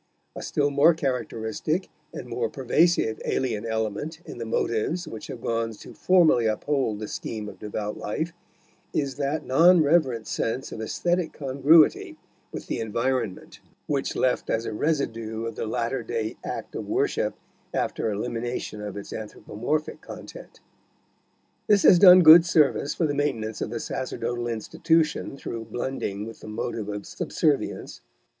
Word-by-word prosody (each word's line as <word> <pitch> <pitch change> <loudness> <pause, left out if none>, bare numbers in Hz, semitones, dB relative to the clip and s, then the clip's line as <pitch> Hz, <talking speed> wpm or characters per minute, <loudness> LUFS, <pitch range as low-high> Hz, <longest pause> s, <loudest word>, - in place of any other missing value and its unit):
A - - -6
still 145 -1 0
more 150 +4 +5
characteristic 135 - -2 0.2
and - - -8
more 120 -1 -2
pervasive 135 -2 +2
alien 115 -4 -1
element 110 +8 -3
in - - -9
the 115 - -4
motives 115 +10 -1
which 110 - -8
have 120 - -8
gone 115 -1 -1
to - - -12
formally 165 -11 +4
uphold 115 0 0
the 105 0 -5
scheme 105 0 -5
of - - -10
devout 105 0 -4
life 160 +11 -3 0.6
is 140 -3 -1
that 145 +2 -2
non 165 +5 +6
reverent 140 -8 +2
sense 120 +4 -2
of 110 - -6
aesthetic 175 +9 -1
congruity 140 +3 +3 0.3
with - - -7
the - - -3
environment, 115 -1 -2 0.3
which 140 -2 -1
is - - -6
left 130 - 0
as 115 +1 0
a 110 - -3
residue 115 -5 -2
of 115 - -4
the 110 - -4
latter 120 +3 -1
day 110 -1 -3
act - - -5
of - - -5
worship - - 0 0.4
after - - -1
elimination 115 +1 -3
of 105 -1 -6
its 100 - -7
anthropomorphic 110 +7 -4
content. - - -11 1.1
This 205 -2 +4
has 180 - +7
done 180 -1 +9
good 165 +1 +10
service 150 -4 +2
for 170 - +1
the 145 - 0
maintenance 125 -7 -2
of - - -2
the 115 +1 -4
sacerdotal 120 -1 -3
institution 155 - 0
through 115 -4 -6
blending 110 -3 -4
with 115 - -9
the - - -11
motive 105 0 -4
of 105 -1 -5
subservience. - - -1
120 Hz, 150 wpm, -25 LUFS, 110-155 Hz, 1.1 s, good